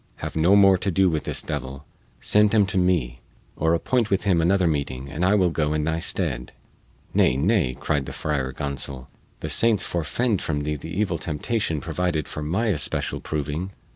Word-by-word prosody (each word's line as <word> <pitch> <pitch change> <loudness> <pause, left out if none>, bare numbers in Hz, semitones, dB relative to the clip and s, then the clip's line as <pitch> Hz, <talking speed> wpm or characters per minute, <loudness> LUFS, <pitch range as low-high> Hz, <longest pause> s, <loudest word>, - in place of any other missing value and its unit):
Have - - -6
no 85 +5 +4
more 95 -2 +6
to 100 - -1
do 95 0 +3
with 80 -2 -2
this - - -2
devil; 70 0 -5 0.3
send 105 +1 +4
him 105 -2 +5
to 95 0 -2
me, 80 -10 +1 0.4
or 80 +1 +2
appoint 115 +5 0
with 95 0 +1
him 90 -5 +2
another 90 +2 +2
meeting 70 -4 -2
and 75 +4 -3
I 95 +3 +4
will 90 -4 +3
go 75 -2 0
in 75 -1 0
thy 80 +1 -1
stead." 75 -8 -2 0.6
"Nay, 65 - +3
nay," 80 - +1
cried 70 -3 -1
the - - -5
Friar 70 -4 -2
Gonsol, 70 -2 -5 0.3
"the - - -3
saints 110 -4 +3
forefend 95 +7 -1
from 75 -2 -2
thee 75 +1 -2
the 75 +3 -8
evil 90 -1 -1
temptation 80 +2 -2
provided 85 -2 -2
for 75 - -6
my 95 +10 0
especial 75 -9 -1
proving! 75 +5 -3
80 Hz, 190 wpm, -24 LUFS, 75-95 Hz, 0.6 s, more